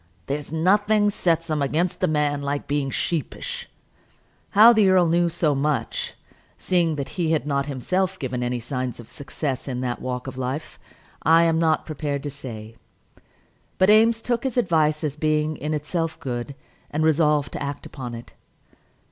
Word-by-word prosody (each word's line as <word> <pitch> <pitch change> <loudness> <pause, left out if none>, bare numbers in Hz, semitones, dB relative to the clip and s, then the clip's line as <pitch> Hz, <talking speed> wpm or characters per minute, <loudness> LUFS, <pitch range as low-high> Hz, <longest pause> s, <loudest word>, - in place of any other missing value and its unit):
There's 145 +1 -4
nothing 205 +5 +3
sets 165 -4 0
'em 150 -1 0
against 160 +6 0
a - - +5
man 150 -2 0
like 140 0 -2
being 145 -1 0
sheepish." 155 +2 -3 0.9
How 225 +3 +10
the 215 -4 +4
earl 185 -2 +5
knew 170 +1 +2
so 160 -3 +1
much, 140 +1 -1 0.4
seeing 170 -4 +1
that 140 -2 -4
he 165 -3 0
had 155 - 0
not 140 -1 0
himself 185 +8 -1
given 130 -4 -3 0.2
signs 125 +1 -3
of 120 - -9
any - - -17
success 140 -1 -4
in 125 -2 -3
that 125 -1 -3
walk 125 -1 -4
of 130 -1 -7
life, 130 +4 -4 0.4
I 165 +1 +5
am 165 -1 +2
not 160 -1 +2
prepared 145 -2 -3
to 145 - -4
say. 115 -3 -9 1.0
But 190 +2 +5
Eames 225 +1 +4
took 240 -1 -1
his 260 -2 -2
advice 155 -7 +2
as 145 -2 -2
being 155 0 +1
in 150 +3 -4
itself 160 +2 -2
good, 125 +1 -4 0.3
and 155 +1 -1
resolved 150 -3 +2
to - - -6
act 140 0 -4
upon 125 -4 -7
it. 115 - -11
150 Hz, 170 wpm, -24 LUFS, 140-170 Hz, 1.0 s, How